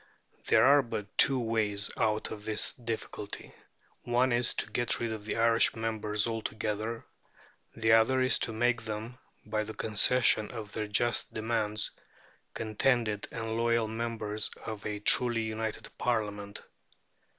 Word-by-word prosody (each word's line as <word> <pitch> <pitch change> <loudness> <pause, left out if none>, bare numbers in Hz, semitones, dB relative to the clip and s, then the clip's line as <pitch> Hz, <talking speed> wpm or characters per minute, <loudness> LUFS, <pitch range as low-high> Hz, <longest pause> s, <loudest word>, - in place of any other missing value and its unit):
There 110 - +5
are 140 +2 +6
but 105 -5 -6
two 135 -2 +6
ways 110 -3 0
out 110 -1 0
of 105 -1 -7
the 105 -1 +1
difficulty. 110 -2 -6 0.5
One 125 +2 +1
is 120 0 +2
to - - -3
get 120 -1 +1
rid 115 -1 -2
of 105 -1 -8
the 110 - -3
Irish 115 0 +4
members 110 -2 0
altogether; 110 0 -3 0.7
the 110 0 +1
other 115 +4 +4
is 130 0 +2
to 115 - -1
make 120 +1 +1
them, 110 +3 -6 0.3
by 110 0 -1
the 110 +1 -8
concession 110 0 +3
of 110 -4 -8
their 110 0 -3
just 120 +3 0
demands, 110 -1 0 0.6
contented 110 -1 0
and 110 -1 -4
loyal 115 -1 +1
members 110 -2 -2 0.2
of 110 -2 -6
a 105 -1 -4
truly 120 +1 +3
united 110 0 -5
Parliament. 105 -4 -2
110 Hz, 140 wpm, -30 LUFS, 105-115 Hz, 0.7 s, are